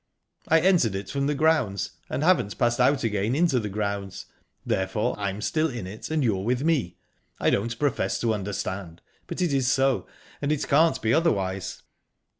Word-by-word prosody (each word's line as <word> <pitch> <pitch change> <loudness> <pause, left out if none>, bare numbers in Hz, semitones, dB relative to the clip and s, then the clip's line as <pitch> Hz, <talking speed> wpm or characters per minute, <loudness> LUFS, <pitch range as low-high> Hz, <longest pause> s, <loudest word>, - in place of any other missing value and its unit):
"I 165 0 +4
entered 165 - +3
it 95 0 -5
from 140 0 0
the 150 - 0
grounds, 145 - +1 0.2
and 140 - -2
I - - +2
haven't 105 - +2
passed 120 0 +1
out 135 +2 +3
again 105 +2 0
into 160 -5 +3
the 105 -2 -4
grounds, 100 -1 -3 0.4
therefore 95 +3 0
I'm 100 0 -3
still 155 +7 +1
in 120 -7 -5
it 100 +8 -8
and 155 -2 0
you're 100 -6 +1
with 125 +4 0
me. 150 - 0 0.4
I - - +2
don't 115 +3 -1
profess 130 -9 0
to 115 -2 +1
understand, 95 -4 -4 0.2
but 180 - -2
it 165 -5 0
is 135 -2 +2
so, 135 -1 +1 0.3
and 145 +1 0
it 150 - -1
can't 160 +3 +4
be 110 0 +2
otherwise." 95 - 0
120 Hz, 185 wpm, -25 LUFS, 100-145 Hz, 0.4 s, I